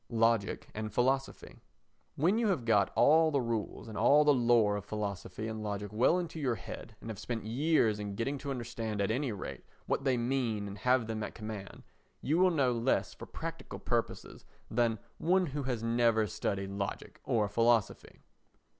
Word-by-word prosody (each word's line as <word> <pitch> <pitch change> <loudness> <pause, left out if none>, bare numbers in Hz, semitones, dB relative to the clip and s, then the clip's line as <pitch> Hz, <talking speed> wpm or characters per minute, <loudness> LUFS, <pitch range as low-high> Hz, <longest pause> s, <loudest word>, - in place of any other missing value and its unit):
Logic 115 -3 +1
and 110 0 -4
Philosophy 130 +5 -1 0.6
When 180 +10 +2
you 235 - +2
have 165 - 0
got 105 -4 +3
all 160 +2 +5
the 145 -2 +1
rules 115 -4 -3
and 110 - -8
all 150 +6 +5
the 150 -1 +5
lore 120 -5 +3
of 105 - -4
philosophy 105 0 -4
and 110 -1 -5
logic 105 -1 -4
well 125 +10 +4
into 170 -2 -4
your 130 -5 0
head, 110 - -9
and 115 - -6
have 100 - -8
spent 115 -4 -4
years 120 -3 +2
in 100 -1 -4
getting 135 +6 -2
to 140 - -6
understand 115 -4 -4
at 100 +2 +1
any 130 +2 -1
rate 100 - -6 0.2
what - - -1
they 130 -2 +2
mean 120 -4 -1
and 100 0 -8
have 125 +1 +2
them 110 -1 -4
at 105 - -5
command, 110 -3 -7 0.4
you 155 +5 +1
will 185 0 +6
know 140 -7 +2
less 120 +2 0
for - - -10
practical - - -7
purposes - - -3 0.3
than 115 -1 +2 0.2
one 185 +2 +3
who 145 -2 -4
has 125 -4 -3
never 115 -1 +3
studied 95 0 -3
logic 100 0 -5
or 110 -3 +1
philosophy. 115 +1 +1
115 Hz, 180 wpm, -31 LUFS, 105-135 Hz, 0.6 s, will